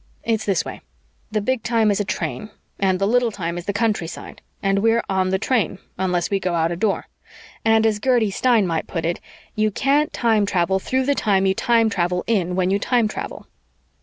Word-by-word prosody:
It's 220 Hz, -2 st, -1 dB
this 195 Hz, -, +1 dB
way: -, -, -7 dB, 0.5 s
the 215 Hz, -1 st, 0 dB
Big 260 Hz, +3 st, 0 dB
Time 220 Hz, -1 st, +2 dB
is 200 Hz, -, 0 dB
a -, -, +1 dB
train, 210 Hz, +2 st, -4 dB, 0.3 s
and 190 Hz, -2 st, +2 dB
the 195 Hz, -, 0 dB
Little 245 Hz, +3 st, +2 dB
Time 170 Hz, -5 st, -4 dB
is 175 Hz, 0 st, -7 dB
the -, -, +1 dB
countryside 205 Hz, -5 st, -3 dB, 0.2 s
and 195 Hz, 0 st, +2 dB
we're 225 Hz, +2 st, +2 dB
on 190 Hz, -1 st, 0 dB
the 190 Hz, -, +1 dB
train, 230 Hz, -2 st, 0 dB, 0.2 s
unless 180 Hz, -1 st, -1 dB
we 200 Hz, -, +1 dB
go 180 Hz, -2 st, -1 dB
out 165 Hz, 0 st, +1 dB
a -, -, -2 dB
Door, 200 Hz, +3 st, -1 dB, 0.6 s
and 225 Hz, 0 st, +4 dB
as 215 Hz, -2 st, +1 dB
Gertie 235 Hz, -3 st, +2 dB
Stein 230 Hz, 0 st, +3 dB
might 165 Hz, -3 st, -2 dB
put 165 Hz, -3 st, -3 dB
it, 170 Hz, +1 st, -1 dB, 0.3 s
you 215 Hz, 0 st, +1 dB
can't 280 Hz, +8 st, +1 dB
time 220 Hz, -4 st, +2 dB
travel 190 Hz, 0 st, +1 dB
through 260 Hz, +6 st, -1 dB
the 285 Hz, -, +3 dB
time 195 Hz, -7 st, +1 dB
you 190 Hz, -, +3 dB
time 230 Hz, +2 st, +2 dB
travel 180 Hz, -3 st, 0 dB
in 185 Hz, -6 st, 0 dB
when 185 Hz, 0 st, +1 dB
you 200 Hz, -, +2 dB
time 235 Hz, +1 st, +2 dB
travel. -, -, -6 dB
205 Hz, 210 wpm, -21 LUFS, 185-225 Hz, 0.6 s, and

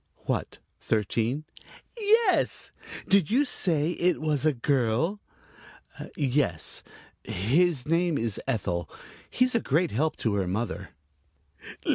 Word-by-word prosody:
"What, -, -, -2 dB, 0.2 s
thirteen?" 115 Hz, +7 st, -1 dB, 0.5 s
"Yes. 440 Hz, -2 st, +2 dB, 0.4 s
Did 195 Hz, -6 st, +4 dB
you 270 Hz, +6 st, +3 dB
say 165 Hz, -, +1 dB
it 175 Hz, +1 st, +1 dB
was 155 Hz, -1 st, 0 dB
a -, -, +5 dB
girl?" 135 Hz, -, 0 dB, 1.0 s
"Yes, 135 Hz, -, 0 dB, 0.4 s
his 135 Hz, -, +1 dB
name's 160 Hz, -, +1 dB
Ethel. 90 Hz, -9 st, -1 dB, 0.4 s
He's 255 Hz, 0 st, +2 dB
a 230 Hz, -, +3 dB
great 165 Hz, 0 st, +1 dB
help 155 Hz, +7 st, 0 dB
to 110 Hz, -, -1 dB
her 100 Hz, -2 st, 0 dB
mother." 95 Hz, -2 st, -3 dB
145 Hz, 105 wpm, -27 LUFS, 115-175 Hz, 1.0 s, a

